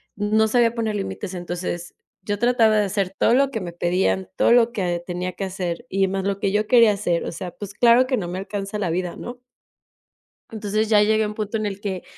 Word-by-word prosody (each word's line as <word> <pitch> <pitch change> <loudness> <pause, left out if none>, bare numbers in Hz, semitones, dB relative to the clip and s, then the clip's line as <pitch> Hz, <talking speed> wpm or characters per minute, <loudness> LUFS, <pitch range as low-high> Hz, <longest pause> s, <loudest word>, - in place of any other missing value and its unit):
no 215 +2 +2
sabía 235 0 +3
poner 220 -2 -1
límites. 195 -1 -4
Entonces 175 -1 -5 0.3
yo 205 0 -3
trataba 235 -2 +3
de 210 - +3
hacer 195 -1 -1
todo - - +3
lo 275 +1 +3
que 225 -5 -3
me 175 -2 -5
pedían, 170 - 0
todo - - +3
lo 240 -1 +5
que 180 -6 -2
tenía 180 0 -4
que 195 - -5
hacer 185 +2 -4
y 195 0 +1
más 190 0 -2
lo 200 0 -1
que 200 -2 0
yo 210 +1 0
quería 230 -3 +6
hacer. 175 -4 -1
O - - -4
sea, 175 +1 -6
pues 205 +1 -9
claro 240 +4 +5
que 255 -1 0
no 185 -5 -3
me 180 +2 -4
alcanza 200 +1 -5
la 190 -4 -1
vida, 175 +1 -2
¿no? 245 0 -9 1.1
Entonces 215 0 -1
ya 210 -2 +5
llegué 215 +1 +3
a - - -1
un 210 - -5
punto 210 +1 -3
en 215 - -3
el 200 -1 -4
que 190 -3 -4
205 Hz, 230 wpm, -22 LUFS, 185-220 Hz, 1.1 s, quería